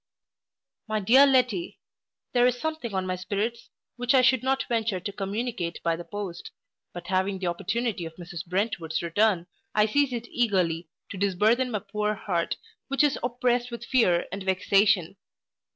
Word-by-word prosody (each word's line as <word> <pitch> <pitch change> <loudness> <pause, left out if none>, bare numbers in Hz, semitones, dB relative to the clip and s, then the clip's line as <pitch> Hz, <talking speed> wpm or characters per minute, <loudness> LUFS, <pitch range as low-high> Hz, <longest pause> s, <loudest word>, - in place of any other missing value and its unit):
MY 215 -1 -1
DEAR 260 +8 +7
LETTY, 250 -9 +1 0.5
There 245 0 +5
is 250 -1 0
something 315 -6 -3
on 190 0 0
my 185 0 -1
spirits, 205 +6 -3 0.3
which 245 +2 +2
I 255 - +6
should 260 -2 +4
not 265 +1 0
venture 225 -5 0
to 200 - -5
communicate 200 -2 -3
by 165 -1 +1
the 170 - -7
post, 200 -2 -6 0.4
but 175 0 -8
having 190 +1 0
the 185 - -5
opportunity 200 +3 -1
of 165 - -12
Mrs 175 -1 -7
Brentwood's 175 -4 -2
return, 180 +1 +2 0.3
I 210 0 +5
seize 280 +5 +2
it 240 -1 -4
eagerly, 180 -8 0 0.2
to 195 - -6
disburthen 210 +6 +2
my 210 -4 -3
poor 210 0 0
heart, 175 -4 -2 0.3
which 275 +2 +2
is 295 - +2
oppressed 245 0 0
with 235 -1 -7
fear 185 -10 +3
and 195 +1 -5
vexation. 195 0 +2
210 Hz, 165 wpm, -26 LUFS, 185-240 Hz, 0.5 s, DEAR